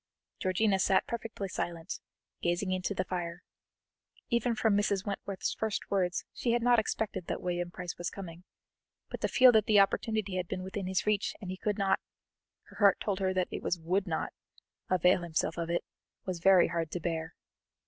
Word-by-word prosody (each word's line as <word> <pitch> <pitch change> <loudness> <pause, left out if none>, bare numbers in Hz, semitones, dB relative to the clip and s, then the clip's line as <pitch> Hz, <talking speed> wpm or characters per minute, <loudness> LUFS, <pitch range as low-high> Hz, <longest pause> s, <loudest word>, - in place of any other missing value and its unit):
Georgiana 195 +1 +2
sat 190 0 +3
perfectly 230 -4 -4
silent, 170 -1 -4 0.4
gazing 175 +2 0
into 185 +2 -1
the 185 - 0
fire. 175 -1 -4 0.9
Even 235 0 +1
from 220 -1 +2
Mrs. 205 -1 +1
Wentworth's 200 -1 -3
first 220 -2 -3
words 180 -3 +1
she 235 - 0
had 240 -1 +1
not 245 -1 +5
expected 215 -4 -2
that - - -2
William 175 -1 -2
Price 180 -1 -6
was 175 - -2
coming, 175 -3 -9 0.7
but - - -5
to - - +2
feel 255 -1 +7
that 220 -3 +3
the 210 -2 +6
opportunity 200 -1 +1
had 180 -1 -2
been 185 - -4
within 190 0 -4
his 190 -1 0
reach, 210 -1 +1
and 185 -4 -6
he - - -3
could 210 +1 -1
not 195 -1 +2 0.6
her - - -16
heart 200 -3 +5
told 200 -2 -1
her 190 -1 +1
that 185 -1 0
it - - -4
was 180 - 0
would 185 +4 0
not 160 - -2 0.6
avail 180 0 +4
himself 165 -1 -1
of 170 -1 -3
it, 170 - 0 0.4
was 185 -2 -3
very 185 0 +6
hard 165 -1 -1
to 180 - -3
bear. 160 -1 -3
185 Hz, 190 wpm, -31 LUFS, 175-205 Hz, 0.9 s, feel